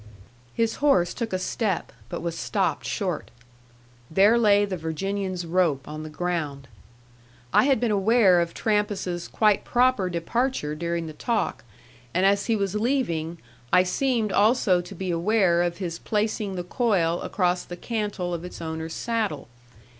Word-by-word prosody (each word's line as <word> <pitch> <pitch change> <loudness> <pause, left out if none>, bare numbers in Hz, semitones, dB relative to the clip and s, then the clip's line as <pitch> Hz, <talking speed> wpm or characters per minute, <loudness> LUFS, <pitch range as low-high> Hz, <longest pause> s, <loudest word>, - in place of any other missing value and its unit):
His 230 -1 0
horse 185 -12 +3
took 230 -2 -4
a 185 - 0
step, 195 0 -2 0.2
but 175 - -5
was 170 -1 -2
stopped 120 -5 -1
short. - - -2 0.8
There 200 +7 +5
lay 205 -3 +4
the 195 -2 -3
Virginian's 185 +2 -3
rope 165 -5 +1
on 155 +1 -6
the 155 - -7
ground. 155 -5 -3 0.9
I - - +5
had 275 -4 +3
been 240 -2 +1
aware 200 -3 +4
of 170 0 -3
Trampas's 205 -5 -1
quite 210 -2 +2
proper 245 -6 +2
departure 175 - -1
during 170 +1 -2
the 155 - -7
talk; 230 +8 -2 0.5
and 185 +2 +3
as 200 +1 +3
he 230 - +2
was 200 -2 -1
leaving, 210 - -1 0.3
I 180 - +6
seemed 225 +2 0
also 200 -3 +3
to 180 +3 -10
be 185 0 -3
aware 175 0 +2
of 175 -1 -1
his 170 -4 -4
placing 210 -2 -1
the 180 - -3
coil 180 -5 +1
across 180 -2 0
the 175 - -8
cantle 205 -5 -3
of 170 -1 -4
its 180 - -8
owner's 160 0 -5
saddle. 215 - -2
185 Hz, 155 wpm, -25 LUFS, 170-215 Hz, 0.9 s, I